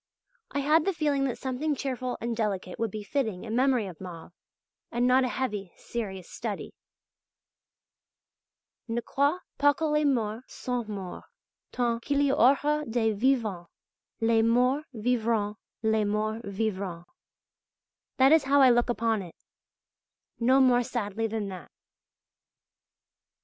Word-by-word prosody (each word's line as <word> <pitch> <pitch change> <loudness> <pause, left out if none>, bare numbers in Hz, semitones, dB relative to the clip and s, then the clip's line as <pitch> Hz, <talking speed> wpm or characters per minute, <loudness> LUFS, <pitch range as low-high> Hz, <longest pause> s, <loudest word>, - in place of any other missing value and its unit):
I 280 - -2
had 305 +3 +3
the 390 - +1
feeling 290 -4 +1
that 255 - -2
something 270 +3 -2
cheerful 255 -2 -3
and 235 0 -2
delicate 200 -5 -2
would 230 -1 0
be 210 +1 -6
fitting 215 -4 -2
in 225 0 -4
memory 255 -3 +3
of 185 -3 -9
Mauve, 175 -2 -9 0.6
and 240 +1 +1
not 255 +1 +5
a - - +1
heavy, 210 -8 -3
serious 190 -6 -5
study. - - -5 2.1
Ne 235 +1 -1
crois 285 +8 0 0.2
pas 290 0 +5
que 320 - -1
les 300 0 +2
morts 230 -4 0
soient 245 -3 -3
morts, 195 -4 -6 0.4
Tant 235 -2 0
qu'il 280 +3 0
y 285 -1 +3
aura 290 +3 +3
des 225 -1 +1
vivants 215 -6 0 0.5
Les 225 0 +4
morts 250 +5 +3
vivront, 220 -3 0 0.3
les 220 -1 +2
morts 215 +2 -1
vivront. 195 -4 -3 1.1
That 265 +1 +6
is 320 -3 +5
how 280 +1 +4
I 260 -2 +7
look 240 +1 +2
upon 225 -3 +1
it 175 -3 -10 1.0
no 255 +3 +4
more 250 -2 +5
sadly 225 -3 -2
than 215 -2 -3
that. 185 -2 -9
235 Hz, 140 wpm, -28 LUFS, 210-265 Hz, 2.1 s, I